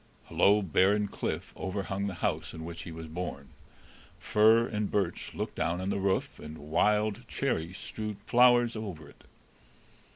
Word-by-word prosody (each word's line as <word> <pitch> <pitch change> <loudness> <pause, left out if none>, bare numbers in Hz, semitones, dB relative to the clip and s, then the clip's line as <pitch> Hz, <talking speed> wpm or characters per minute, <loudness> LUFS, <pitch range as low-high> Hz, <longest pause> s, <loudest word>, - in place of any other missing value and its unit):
A - - -8
low, 105 +1 +5
barren 100 +4 +3
cliff - - -4
overhung 95 +1 -3
the 95 - -4
house - - -2
in 80 - -7
which 85 0 -7
he 85 - -8
was 80 0 -7
born; 80 -4 -6 0.7
fir 110 +2 +4
and 105 -3 -2
birch 100 -4 -2
looked - - -3
down 85 +2 -1
on 95 +2 -2
the 100 - -1
roof, 95 0 -1
and 75 +1 -8
wild 105 +9 +1
cherry 90 -12 -1
strewed 105 +2 -6
flowers 120 -1 +5
over 95 -9 -6
it. - - -19
100 Hz, 160 wpm, -30 LUFS, 85-105 Hz, 0.7 s, low